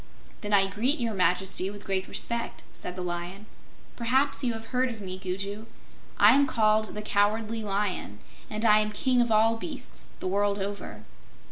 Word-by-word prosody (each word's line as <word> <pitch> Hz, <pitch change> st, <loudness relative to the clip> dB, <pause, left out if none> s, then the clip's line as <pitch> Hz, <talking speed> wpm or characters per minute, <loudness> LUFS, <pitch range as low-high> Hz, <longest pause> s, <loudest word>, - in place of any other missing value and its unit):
"Then 210 Hz, -, -4 dB
I 200 Hz, -1 st, +6 dB
greet 230 Hz, +10 st, 0 dB
Your 230 Hz, -2 st, -1 dB
Majesty 185 Hz, 0 st, +1 dB
with 205 Hz, 0 st, -9 dB
great 190 Hz, -1 st, -1 dB
respect," 235 Hz, 0 st, -1 dB
said 180 Hz, -, -7 dB
the 185 Hz, -, -4 dB
Lion. 175 Hz, +3 st, -5 dB, 0.5 s
"Perhaps 265 Hz, +4 st, +1 dB
you 240 Hz, -2 st, +1 dB
have 225 Hz, 0 st, -7 dB
heard 255 Hz, +1 st, +2 dB
of 230 Hz, -2 st, -7 dB
me, 185 Hz, -2 st, -4 dB
Gugu. 195 Hz, +3 st, -4 dB, 0.5 s
I -, -, +7 dB
am 280 Hz, 0 st, +4 dB
called 215 Hz, -2 st, +2 dB
the 210 Hz, -, -4 dB
'Cowardly 215 Hz, +2 st, +1 dB
Lion,' 195 Hz, -, -2 dB, 0.3 s
and 215 Hz, +1 st, -3 dB
I 215 Hz, -1 st, +6 dB
am 215 Hz, 0 st, -1 dB
King 250 Hz, +4 st, +2 dB
of 235 Hz, -1 st, 0 dB
all 225 Hz, +1 st, +4 dB
Beasts, 265 Hz, +1 st, -5 dB
the -, -, -3 dB
world 200 Hz, +1 st, +1 dB
over." 195 Hz, -, -5 dB
210 Hz, 175 wpm, -27 LUFS, 195-230 Hz, 0.5 s, I